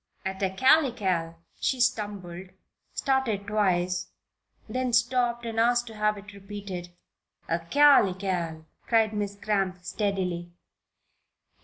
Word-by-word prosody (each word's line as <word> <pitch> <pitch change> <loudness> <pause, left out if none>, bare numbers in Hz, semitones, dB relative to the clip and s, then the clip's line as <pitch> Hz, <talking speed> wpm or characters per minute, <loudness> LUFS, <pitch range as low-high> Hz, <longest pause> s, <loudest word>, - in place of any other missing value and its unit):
At 190 0 -3
"acalycal" 195 - +2 0.2
she 260 - 0
stumbled, 195 -6 -1 0.4
started 265 -7 0
twice, 180 -4 0 0.6
then 255 -1 -2
stopped 240 0 +2
and 225 -1 -2
asked 240 +1 +3
to 225 -2 -10
have 210 0 +1
it 205 +1 -11
repeated. 195 -3 -7 0.6
"'Acalycal,'" 180 - +3 0.2
said 225 -2 +3
Miss 205 -1 -3
Cramp, 195 -4 -1
steadily. 185 -3 -2
205 Hz, 100 wpm, -27 LUFS, 185-235 Hz, 0.6 s, asked